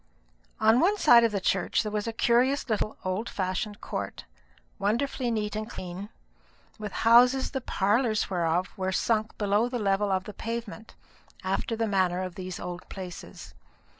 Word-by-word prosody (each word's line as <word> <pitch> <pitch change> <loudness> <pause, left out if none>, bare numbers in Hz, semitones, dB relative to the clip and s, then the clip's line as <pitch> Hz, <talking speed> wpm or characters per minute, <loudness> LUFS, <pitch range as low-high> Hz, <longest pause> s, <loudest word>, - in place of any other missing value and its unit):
On 220 +2 +5
one 395 +7 +3
side 240 -10 +7
of 230 - +3
the 200 - -1
church 190 +2 +1
there 210 - -4
was 210 +1 -2
a - - -1
curious 245 +5 +2
little 215 -1 -1
old 185 +5 -2
fashioned 195 +2 -3
court, - - -5 0.5
wonderfully 240 +5 0
neat 210 -2 -2
and 215 +1 -4
clean, 185 0 -7 0.7
with 210 -1 -5
houses 250 +3 +6
the 265 - -3
parlours 215 +1 +1
whereof 175 -1 -1
were 190 -2 -2
sunk 220 +2 0
below 205 +3 +1
the 245 - -2
level 200 -1 +1
of 190 -1 +1
the 210 - -8
pavement, 225 0 -6 0.5
after 195 +4 -1
the 225 0 0
manner 185 -3 +1
of 185 -1 -5
these 185 -1 -6
old 180 0 -7
places. 185 -2 -9
210 Hz, 165 wpm, -27 LUFS, 190-230 Hz, 0.7 s, side